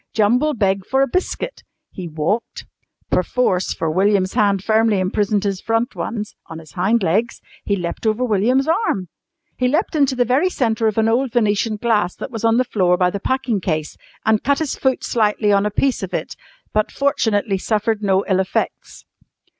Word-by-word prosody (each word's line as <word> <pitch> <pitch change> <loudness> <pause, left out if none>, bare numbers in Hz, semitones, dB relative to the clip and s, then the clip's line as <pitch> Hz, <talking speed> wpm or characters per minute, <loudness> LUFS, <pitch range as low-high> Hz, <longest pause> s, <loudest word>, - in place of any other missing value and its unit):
Jumble 245 +8 +2
begged 195 -3 0
for 265 +1 +2
a - - +1
biscuit, 370 - -3 0.3
he 180 -2 -7
walked 160 +8 -3 0.5
(perforce, 185 -1 +1
for 160 - -2
William's 190 +1 +2
hand 200 -2 +2
firmly 220 0 +2
imprisoned 205 +2 0
his 195 -2 -2
front 230 +2 -1
ones) 215 -2 -4
on 165 - -8
his 160 -3 -13
hind 200 +8 +1
legs, 205 +8 0 0.3
he 200 - +1
leapt 175 +4 -4
over 220 +4 +1
William's 245 +6 +2
arm. 320 - 0 0.5
He 250 - +2
leapt 315 +7 0
into 280 -3 +2
the 245 -1 +2
very 270 +10 +2
centre 225 -8 0
of 215 - -1
an 220 0 +3
old 245 +3 +1
Venetian 215 -1 +1
glass 210 -4 0
that - - -7
was 225 -2 -6
on 225 0 +3
the 255 - +4
floor 185 -7 +1
by 180 -1 +2
the 200 - -4
packing 245 -3 -1
case 155 -4 -2 0.3
and 220 -1 +2
cut 280 0 +2
his 310 -2 -2
foot 265 -1 0
slightly 210 -2 +1
on 200 +1 +3
a - - 0
piece 260 +5 0
of - - -4
it, - - -4 0.4
but 215 0 +1
fortunately 220 -7 0
suffered 215 +1 0
no 195 -1 +1
ill 190 -2 +2
effects. 190 0 -3
215 Hz, 185 wpm, -20 LUFS, 195-245 Hz, 0.5 s, the